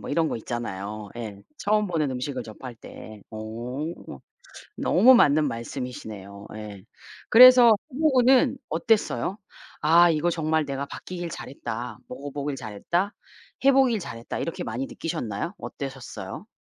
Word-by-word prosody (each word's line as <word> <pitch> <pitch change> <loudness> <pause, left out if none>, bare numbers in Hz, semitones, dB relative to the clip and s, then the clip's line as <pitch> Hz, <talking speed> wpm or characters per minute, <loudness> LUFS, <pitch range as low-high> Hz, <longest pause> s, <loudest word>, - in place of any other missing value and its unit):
뭐 - - -7
이런 160 +1 +2
거 - - -2
있잖아요. 105 -3 -5
예 110 -4 -6 0.2
처음 210 0 +1
보는 155 -6 0
음식을 130 0 -3
접할 115 +3 -9
때. 110 -2 -12
오. 120 +8 -5 0.8
너무 240 +8 +6
맞는 150 -7 +4
말씀이시네요. 115 -5 -7
예. 105 -3 -8 0.5
그래서 250 0 +9 0.2
해 - - -6
보고는 265 -3 +4
어땠어요? 220 -3 +1 0.4
'아 170 +3 +6
이거 165 +2 +1
정말 160 -2 0
내가 140 0 -3
바뀌길 175 +3 -7
잘했다. 120 -6 -6
먹어 140 +3 -7
보길 145 0 -3
잘했다. 155 - -2 0.5
해 275 - +8
보길 260 -5 +3
잘했다.' 115 -8 -6
이렇게 165 - -3
많이 120 +4 -3
느끼셨나요? 165 - -4
어떠셨어요? 135 -3 -7
140 Hz, 300 characters per minute, -25 LUFS, 115-175 Hz, 0.8 s, 그래서